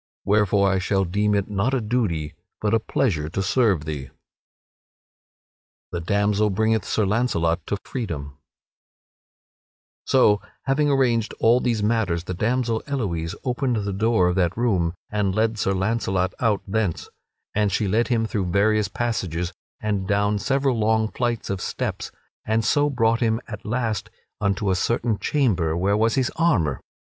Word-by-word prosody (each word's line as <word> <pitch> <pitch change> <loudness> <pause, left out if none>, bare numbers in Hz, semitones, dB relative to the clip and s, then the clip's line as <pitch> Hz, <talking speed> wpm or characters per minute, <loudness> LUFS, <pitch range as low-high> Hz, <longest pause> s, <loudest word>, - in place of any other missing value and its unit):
Wherefore 100 -1 +3
I 95 -1 +2
shall 95 +1 +1
deem 105 +4 +1
it 100 -1 0
not 105 +6 0
a - - +1
duty 105 -10 -1 0.3
but 105 0 0
a 115 - +4
pleasure 85 - -1
to 95 +4 -2
serve 100 - +2
thee." 75 -3 -4
[Sidenote: - - -20 1.8
The 85 - -2
damsel 100 +4 +1
bringeth 110 0 +1
Sir 110 - +1
Launcelot 90 -7 0
to 100 - -1
freedom] 75 - -5 1.7
So, 105 -6 +4 0.2
having 145 +2 +1
arranged 120 -5 +1
all 115 +2 +5
these 115 -4 0
matters, 105 -6 +1
the 90 - -4
damsel 115 +3 0
Elouise 95 -11 -2
opened 125 0 0
the 100 - -2
door 110 -2 +2
of 90 - 0
that 90 0 +1
room 95 -8 +1 0.2
and 100 -3 0
led 110 0 +1
Sir 95 - +1
Launcelot 95 -2 0
out 110 -4 +1
thence; 100 -4 -1 0.5
and 105 -1 +1
she 105 +2 0
led 110 +4 +2
him 115 -2 +1
through 105 -3 -2
various 105 +3 +2
passages 90 -7 -2 0.3
and 105 -3 -2
down 105 0 +1
several 135 0 +1
long 110 0 +2
flights 120 -4 -2
of 95 -2 -3
steps, - - -3 0.3
and 110 +1 0
so 145 0 +3
brought 115 -4 +2
him 115 -1 +1
at 105 -2 -8
last 115 -2 -1 0.3
unto 100 -1 0
a - - +2
certain 115 +3 0
chamber, 95 - +1
where 100 +3 +2
was 110 +1 +2
his 130 -2 +1
armor. 100 - +2
105 Hz, 155 wpm, -23 LUFS, 95-115 Hz, 1.8 s, all